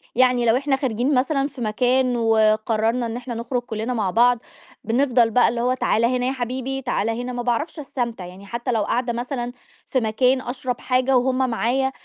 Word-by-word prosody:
يعني 250 -1 +3
لو 230 +2 +4
إحنا 275 0 +1
خارجين 260 +1 0
مثلًا 275 +2 +1
في 265 -4 -11
مكان 250 +3 +1
وقررنا 225 +1 +2
إن 230 +1 -4
إحنا 245 -1 -6
نخرج 240 +2 -2
كلنا 230 +1 -4
مع 205 -5 -1
بعض، 240 +2 +4 0.4
بنفضل 240 -1 +2
بقى 245 +2 +4
اللي 235 0 -2
هو 250 +1 +2
تعالَ 235 -2 +1
هنا 250 0 0
يا - - +1
حبيبي، 260 +1 -3
تعالَ 230 -3 -1
هنا. 245 +2 -3
ما 245 - -3
باعرفش 295 +7 -1
استمتع 235 -8 -4
يعني، 185 +3 -11
حتى 235 +4 -3
لو 225 -2 +1
قاعدة 240 +1 -1
مثلًا 245 0 -3 0.4
في 260 - +1
مكان 250 +4 +2
أشرب 250 0 -4
حاجة 255 0 +2
وهُم 260 0 +1
معايا، 260 +4 0
245 Hz, 190 wpm, -22 LUFS, 230-255 Hz, 0.4 s, لو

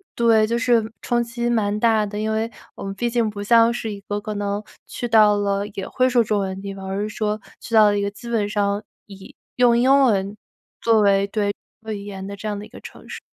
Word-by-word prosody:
对， 225 -2 +4
就 235 +2 -1
是 235 -2 +2
冲 240 -1 0
击 235 0 -3
蛮 210 -3 0
大 220 -1 +3
的。 205 0 -5
因 215 0 -1
为 220 +1 -1 0.3
我 - - -8
们 195 0 -4
毕 240 +4 -1
竟 235 -2 +1
不 205 -1 -7
像 230 +2 +5
是 230 -2 -4
一 200 - -9
个 205 +1 -4
可 210 +1 -5
能 205 0 -2 0.3
去 240 - -4
到 215 -2 +5
了 200 0 0
也 195 - -5
会 255 0 +1
说 245 -2 +3
中 210 -1 0
文 190 -1 -3
的 190 - -9
地 200 0 -5
方， 195 0 -9
而 195 +1 -2
是 210 - -2
说 210 0 -2 0.2
去 - - -10
到 215 -1 +8
了 205 0 +3
一 - - 0
个 200 - -1
基 205 +4 -12
本 220 -3 0
上 205 0 0 0.2
以 195 -1 -13 0.2
用 245 -1 +5
英 265 +3 +5
文 200 -4 +1 0.5
作 225 -2 +4
为 200 -1 +3
对， 205 0 -1 0.3
主 220 - -21
要 - - -1
语 200 -1 -6
言 195 -2 -7
的 200 - -6
这 215 - -7
样 205 -1 -2
的 205 - -8
一 - - -16
个 - - -12
城 - - -12
市。 - - -7
210 Hz, 280 characters per minute, -22 LUFS, 200-230 Hz, 0.5 s, 到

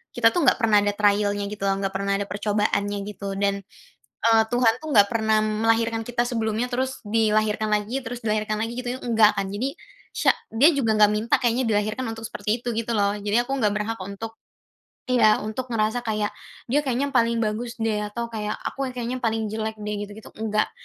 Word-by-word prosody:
kita 230 -1 +5
tuh 350 - +1
nggak - - +5
pernah 220 -4 +4
ada 205 - +1
trial-nya 205 -1 +2
gitu 210 -1 -8
loh, 195 - +2
nggak 195 - -1
pernah 200 +1 -1
ada 200 - -2
percobaannya" 205 0 -1
gitu. 200 -1 -5
Dan, 200 0 0 0.7
eee, 225 -1 +6
Tuhan 240 -2 +4
tuh 315 +4 -10
nggak 200 -2 +7
pernah 220 -2 +2
melahirkan 225 +1 +1
kita 240 0 -1
sebelumnya, 230 0 -1
terus 260 +1 -2
dilahirkan 215 0 +1
lagi, 210 +5 0
terus 245 +1 -5
dilahirkan 215 0 -1
lagi, 230 +2 -3
gitu 250 -1 -3
tuh - - -12
enggak 220 -2 +5
kan. 195 -1 -2
Jadi, 250 +8 -2 0.4
syak - - +2 0.2
dia 270 +9 +6
juga 225 -5 +2
nggak 210 0 +7
minta 225 +2 +2
kayaknya 245 +1 +1
dilahirkan 215 +3 0
untuk 225 - -9
seperti 215 +3 -2
itu, 245 - -3
gitu 230 0 -1
loh. 205 -1 +1
Jadi 205 +3 +1
aku 245 +2 -6
nggak 210 -4 +2
berhak 215 +1 -3
untuk 220 +3 -7 0.8
iya, 215 -4 +5
untuk 230 +4 -4
ngerasa 225 0 0
kayak 210 -1 0 0.4
"Dia 290 - +4
kayaknya 275 0 -1
paling 235 -2 +2
bagus 230 +3 -3
deh," 225 -2 -1
atau 235 +2 -5
kayak, 210 -1 -3 0.2
"Aku 270 -1 -3
yang 255 - -7
kayaknya 245 +1 -3
paling 225 -2 -1
jelek 220 0 -3
deh," 210 -1 -4
gitu-gitu, 210 +1 -12
enggak. 215 -1 0
220 Hz, 200 wpm, -24 LUFS, 210-235 Hz, 0.8 s, nggak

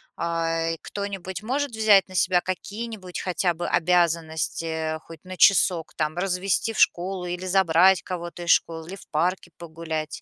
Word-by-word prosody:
А, 165 -1 -1
кто-нибудь 195 -2 -5
может 275 +5 -2
взять 215 -3 +4
на 185 - -13
себя 185 -1 +2
какие-нибудь, 200 0 -6
хотя 180 -1 0
бы 175 - -4
обязанности, 165 -2 0
хоть 165 0 -13
на 185 0 -9
часок, 180 -4 +4
там: 155 0 -1
развести 195 +4 0
в - - -8
школу 180 +1 +1
или 180 +1 -4
забрать, 185 0 +4
кого-то 175 -1 -6
из 170 - +2
школы 165 -1 +1
или 190 - -7
в 195 - -15
парке 175 +3 -1
погулять? 160 -2 -5
180 Hz, 155 wpm, -24 LUFS, 165-190 Hz, -, взять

